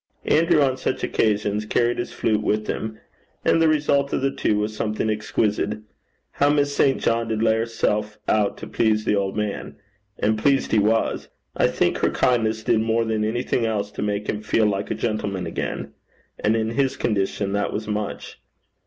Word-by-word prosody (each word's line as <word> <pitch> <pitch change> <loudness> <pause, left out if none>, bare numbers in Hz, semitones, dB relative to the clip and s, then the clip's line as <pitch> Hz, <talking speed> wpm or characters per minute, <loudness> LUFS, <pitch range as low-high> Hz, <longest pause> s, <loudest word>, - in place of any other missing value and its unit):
Andrew 165 -1 +4
on 130 -1 +1
such 130 - -2
occasions 105 -1 0
carried 120 +1 +1
his 120 - -3
flute 105 -2 0
with 105 0 0
him, 110 0 -4 0.5
and 165 - +4
the 165 - +5
result 145 -2 +2
of - - 0
the 135 - +2
two 105 - 0
was 105 +1 -2
something 110 0 -1
exquisite. 105 0 -1 0.5
How 145 - +2
Miss 145 -1 +1
St. 135 -2 +3
John 115 0 0
did 110 -1 -1
lay 110 -1 +4
herself 105 -2 -1
out 105 -2 +1
to - - -7
please 110 -1 +1
the - - +2
old 100 0 -1
man! 105 -1 -3 0.4
And 110 +1 +1
pleased 135 +3 +2
he 110 - +4
was. 110 +2 +1 0.3
I - - +3
think - - 0
her - - +2
kindness 110 -3 +1
did 110 - +2
more 115 +1 +1
than 110 -1 0
anything 120 +1 0
else 105 -2 -2
to - - -6
make 105 0 -2
him 105 - -2
feel 110 +1 +2
like 100 -1 -1
a - - -1
gentleman 100 -5 -2
again. 80 - -4 0.5
And 110 +2 +2
in 110 0 0
his 135 +1 0
condition 100 -2 -1
that 100 0 0
was 105 +1 -4
much. 105 -1 -4
110 Hz, 190 wpm, -23 LUFS, 105-120 Hz, 0.5 s, the